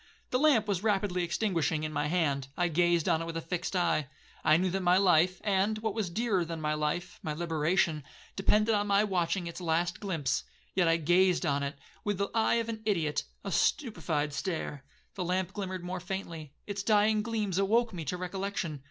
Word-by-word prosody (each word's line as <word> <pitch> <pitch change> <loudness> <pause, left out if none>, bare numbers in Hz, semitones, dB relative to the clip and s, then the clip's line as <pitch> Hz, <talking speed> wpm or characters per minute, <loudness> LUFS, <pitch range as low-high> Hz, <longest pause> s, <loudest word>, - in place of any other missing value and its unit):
The 250 - +2
lamp 265 -8 +4
was 195 -3 0
rapidly 200 -4 +1
extinguishing 170 -4 0
in 155 0 -3
my 150 - 0
hand,—I 150 0 0
gazed 170 0 +2
on 165 -2 +2
it - - -3
with 165 0 -4
a - - 0
fixed 180 +3 -3
eye. 170 -5 +1 0.4
I 155 - +5
knew 185 +1 0
that 190 +1 -1
my 180 0 +4
life, 180 -1 +4
and, 205 +1 +1
what 215 -1 -2
was 215 -4 -2
dearer 205 -1 0
than 165 -1 -5
my 150 -1 0
life, 165 +4 -2
my 155 -3 -3
liberation, 160 0 0 0.3
depended 210 +3 +3
on 205 0 +1
my 200 +1 +4
watching 180 -2 0
its 170 +2 -6
last 170 +2 0
glimpse, 160 -10 -1 0.3
yet 180 -2 +3
I 165 0 +4
gazed 175 +3 +3
on 140 0 +1
it 140 0 -3 0.3
with 205 -2 -1
the 200 +1 -2
eye 225 0 +3
of 230 -1 0
an 225 -1 -3
ideot,—a 165 -8 -2
stupified 160 - 0
stare. 155 -4 -3 0.3
The 185 - -3
lamp 180 0 -1
glimmered 185 -3 -4
more 180 +1 -4
faintly,—its 180 0 -6
dying 210 +1 +3
gleams 210 -4 -1
awoke 225 +4 +2
me 170 -3 -5
to 180 +6 -2
recollection. 185 -4 -3
180 Hz, 190 wpm, -30 LUFS, 165-200 Hz, 0.4 s, I